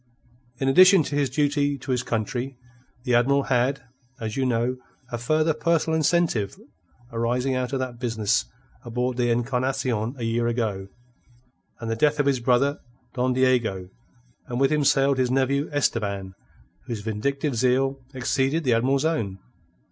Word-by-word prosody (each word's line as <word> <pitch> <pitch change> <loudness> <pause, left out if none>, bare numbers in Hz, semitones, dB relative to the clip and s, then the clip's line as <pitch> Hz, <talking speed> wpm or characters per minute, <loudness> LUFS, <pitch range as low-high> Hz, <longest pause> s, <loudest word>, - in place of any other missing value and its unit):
In 135 - -1
addition 185 +5 +7
to 145 - -4
his 145 -2 +1
duty 145 +1 +1
to 135 - -6
his 125 -1 +1
country, 120 +4 -3 0.5
the 125 -2 0
Admiral 135 +4 +3
had, 130 +2 0 0.4
as 110 -1 -4
you 135 -1 0
know, 120 +1 0 0.3
a 120 - -3
further 155 +5 +1
personal 160 +1 +1
incentive 155 - +1 0.5
arising 120 +3 0
out 130 0 -2
of 135 - 0
that 130 -2 -4
business 110 - 0 0.4
aboard 125 +1 -2
the 120 -1 +1
Encarnacion 125 -1 -1
a 120 - -5
year 115 +1 0
ago, 110 -5 -2 0.9
and 115 -2 -4
the - - 0
death 150 +5 +2
of 145 - +2
his 140 -2 +2
brother 130 +4 +2 0.3
Don 125 0 0
Diego; 120 -8 +1 0.6
and 120 -1 -3
with 135 +1 +3
him 150 -1 +2
sailed 135 0 +3
his 125 -1 +2
nephew 135 +3 +1
Esteban, 100 -9 -1 0.5
whose 115 -4 -4
vindictive 135 +6 -2
zeal 130 +3 +1 0.2
exceeded 135 +5 0
the 125 -4 +2
Admiral's 135 +5 +1
own. 110 -13 -1
130 Hz, 155 wpm, -24 LUFS, 120-140 Hz, 0.9 s, addition